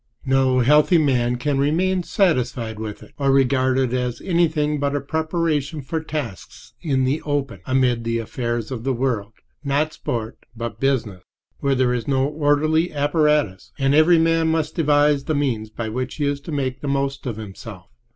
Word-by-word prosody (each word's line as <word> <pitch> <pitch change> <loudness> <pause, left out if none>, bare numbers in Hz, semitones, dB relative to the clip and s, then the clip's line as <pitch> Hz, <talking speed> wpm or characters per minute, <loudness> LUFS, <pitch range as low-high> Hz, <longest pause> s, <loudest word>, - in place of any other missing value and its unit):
No 130 -1 +3
healthy 150 +7 +5
man 125 -5 +2
can 135 +3 -1
remain 180 +6 +1
satisfied 125 - 0
with 110 -2 -6
it, - - -17
or 140 -1 +1
regard 130 -1 +3
it 130 -2 +1
as 125 -1 -2
anything 155 -4 +1
but 140 0 0
a - - +1
preparation 160 0 -1
for 160 +4 -3
tasks 145 - -7
in 135 -5 0
the 135 +4 0
open, 140 - -2
amid 130 -3 +2
the 115 0 -1
affairs 120 0 -3
of 120 -3 -5
the 135 0 0
world—not 135 +5 -2
sport, 115 -1 -4 0.2
but 115 -2 -5
business—where 130 +1 -2
there 125 -1 +2
is 120 -2 -3
no 135 -1 +2
orderly 155 +3 +1
apparatus, 145 - +1
and 135 -1 +2
every 155 +3 +6
man 165 0 +2
must 160 -1 0
devise 145 -3 +3
the 155 - -1
means 120 -7 -1
by 110 +1 -5
which 125 +3 -4
he 150 - -1
is 140 0 -1
to 155 - -8
make 130 -3 -2
the 145 - -4
most 140 -1 -1
of 115 -4 -3
himself. 100 -3 -10
135 Hz, 170 wpm, -22 LUFS, 120-150 Hz, 0.2 s, every